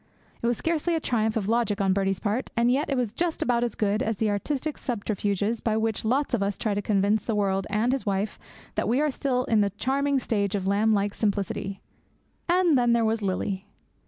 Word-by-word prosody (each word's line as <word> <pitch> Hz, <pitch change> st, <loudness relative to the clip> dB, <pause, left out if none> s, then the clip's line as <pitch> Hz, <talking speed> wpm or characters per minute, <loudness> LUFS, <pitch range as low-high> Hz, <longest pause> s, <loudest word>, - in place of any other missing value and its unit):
It 235 Hz, -, 0 dB
was 240 Hz, -1 st, +1 dB
scarcely 335 Hz, +1 st, 0 dB
a -, -, +1 dB
triumph 220 Hz, -6 st, 0 dB
of 200 Hz, -3 st, -2 dB
logic 225 Hz, -2 st, +1 dB
on 195 Hz, -1 st, +2 dB
Birdie's 195 Hz, -1 st, 0 dB
part, 220 Hz, +5 st, -1 dB
and 235 Hz, +1 st, +4 dB
yet 280 Hz, +4 st, +1 dB
it 275 Hz, -, 0 dB
was 240 Hz, -4 st, -1 dB
just 340 Hz, +4 st, 0 dB
about 240 Hz, -1 st, +1 dB
as 240 Hz, -3 st, -2 dB
good 210 Hz, +1 st, 0 dB
as 225 Hz, -5 st, -1 dB
the 215 Hz, 0 st, +1 dB
artistic 280 Hz, +8 st, -2 dB
subterfuges 210 Hz, -2 st, -1 dB
by 220 Hz, -1 st, 0 dB
which 220 Hz, -1 st, -1 dB
lots 260 Hz, +6 st, 0 dB
of 235 Hz, -, +1 dB
us 200 Hz, 0 st, -1 dB
try 215 Hz, -, -1 dB
to 205 Hz, -, -1 dB
convince 205 Hz, +1 st, +1 dB
the 225 Hz, -, -1 dB
world 195 Hz, -2 st, 0 dB
and 220 Hz, +4 st, +1 dB
his 270 Hz, -, -1 dB
wife 200 Hz, +1 st, -2 dB, 0.3 s
that -, -, -1 dB
we 245 Hz, +4 st, +2 dB
are 300 Hz, 0 st, +2 dB
still 255 Hz, -2 st, 0 dB
in 220 Hz, -4 st, +2 dB
the 200 Hz, -, +2 dB
charming 275 Hz, +7 st, 0 dB
stage 205 Hz, -5 st, 0 dB
of 195 Hz, -2 st, -2 dB
lamb 205 Hz, +3 st, +2 dB
like 205 Hz, -1 st, +1 dB
simplicity. 200 Hz, -2 st, -2 dB, 0.7 s
And 350 Hz, -3 st, +4 dB
then 240 Hz, -2 st, +3 dB
there 230 Hz, -1 st, +3 dB
was 220 Hz, 0 st, 0 dB
Lily. 195 Hz, 0 st, -2 dB
220 Hz, 220 wpm, -26 LUFS, 200-250 Hz, 0.7 s, and